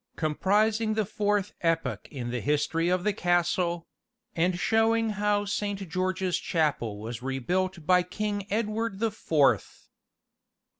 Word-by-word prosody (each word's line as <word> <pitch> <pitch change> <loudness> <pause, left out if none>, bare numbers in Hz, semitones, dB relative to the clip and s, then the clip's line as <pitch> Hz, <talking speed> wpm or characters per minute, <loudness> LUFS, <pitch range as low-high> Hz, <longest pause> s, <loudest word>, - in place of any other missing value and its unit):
Comprising 215 +7 +1
the 215 -1 +1
Fourth 205 0 0
Epoch 150 - 0
in 120 -3 -5
the 120 -1 -2
History 150 +3 +1
of 180 0 +1
the 210 0 +1
Castle 175 -1 +1 0.5
And 175 +2 +1
showing 225 +3 +2
how 205 0 +1
Saint 200 -1 -2
George's 185 +1 -1
Chapel 140 -10 -1
was 115 +2 -6
rebuilt 170 +7 -2
by 180 +2 +5
King 205 +2 -3
Edward 215 -1 -1
the 225 +1 0
Fourth. 145 - +1
185 Hz, 130 wpm, -28 LUFS, 160-210 Hz, 0.5 s, by